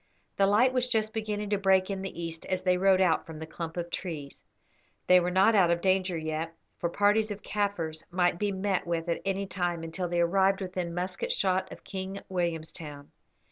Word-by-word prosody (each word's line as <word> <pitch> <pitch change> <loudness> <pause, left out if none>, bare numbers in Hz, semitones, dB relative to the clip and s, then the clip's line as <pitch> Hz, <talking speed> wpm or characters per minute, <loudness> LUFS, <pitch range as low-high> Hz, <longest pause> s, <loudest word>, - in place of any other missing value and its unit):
The 195 - +4
light 235 +6 +4
was 255 -1 +1
just 220 -3 0
beginning 210 -2 -3
to 205 - +2
break 190 0 +3
in 195 -1 -3
the 185 -3 -5
east 165 -1 -6
as 185 -1 -1
they 180 -1 +3
rode 190 +1 +4
out 175 -3 +2
from 160 -1 -8
the 160 - -6
clump 165 +1 -6
of 170 0 -3
trees. 150 -6 -5 0.6
They 180 0 +7
were 175 0 0
not 190 +5 +4
out 190 -5 +5
of 170 0 +2
danger 185 -1 +1
yet, 160 +1 -3 0.2
for 170 - 0
parties 205 +4 +3
of 205 -1 -6
Kaffirs 180 -7 -2
might 175 -1 +1
be 205 -1 0
met 190 -1 -1
with 170 0 -1
at 170 - -1
any 195 0 0
time 175 -3 -2
until 165 +3 -3
they 175 0 0
arrived 190 +3 +3
within 180 -3 -4
musket 180 +1 -2
shot 190 -1 +1
of - - -10
King 190 0 -5
Williamstown. 160 -5 -4
185 Hz, 205 wpm, -29 LUFS, 170-195 Hz, 0.6 s, They